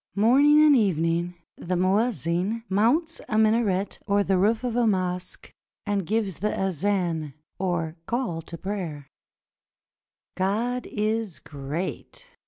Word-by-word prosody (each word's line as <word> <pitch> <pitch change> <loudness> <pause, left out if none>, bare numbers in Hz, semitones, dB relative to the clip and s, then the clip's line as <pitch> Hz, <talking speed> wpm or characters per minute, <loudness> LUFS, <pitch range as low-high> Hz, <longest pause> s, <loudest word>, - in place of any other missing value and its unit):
Morning 280 +8 +5
and 295 -2 +7
evening 175 - +1 0.2
the 180 +1 -3
muezzin 195 +1 0
mounts 250 - +1
a 215 - 0
minaret 215 -3 +2
or 200 0 +3
the 195 -1 +1
roof 215 +6 +2
of 245 -2 -2
a 240 -1 +3
mosque, 180 -2 -2 0.3
and 200 -4 -1
gives 210 -5 -1
the 210 +2 -1
azan, 175 -5 -1 0.2
or 175 -4 -1
call 230 -9 -2
to 170 +1 -9
prayer: 175 -7 -5 1.3
"God 230 +6 -1
is 215 -3 -1
great! 150 - -6
200 Hz, 120 wpm, -25 LUFS, 175-225 Hz, 1.3 s, and